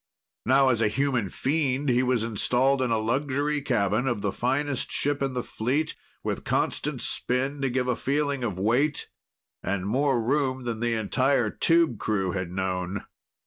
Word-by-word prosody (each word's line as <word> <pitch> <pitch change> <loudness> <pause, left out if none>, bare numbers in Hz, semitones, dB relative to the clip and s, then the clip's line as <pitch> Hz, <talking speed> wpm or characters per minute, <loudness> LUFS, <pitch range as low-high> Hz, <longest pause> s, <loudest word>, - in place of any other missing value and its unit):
Now, 135 +1 +5
as 120 -3 +2
a 110 - +4
human 125 -3 0
fiend, 140 - 0
he 125 0 +3
was 125 -3 +1
installed 125 +5 +1
in 125 - +1
a 115 - +2
luxury 145 +6 0
cabin 120 -2 +1
of 120 -5 -1
the 100 - +1
finest 135 +5 -1
ship 145 0 0
of 135 -2 -1
the 125 - -1
fleet, 140 +8 -1 0.3
with - - -3
constant - - -1
spin 135 +3 -1
to 135 - +1
give 125 0 -1
a 125 - +1
feeling 140 -1 -1
of 105 -6 -2
weight 125 +10 +1 0.5
and 95 0 -2
more 130 +4 +2
room 130 +2 0
than 120 -2 -3
the 120 0 0
entire 120 +1 +1
tube 165 -8 +2
crew 95 -4 0
had 95 -2 -3
known. 95 +1 -2
125 Hz, 170 wpm, -26 LUFS, 110-140 Hz, 0.5 s, Now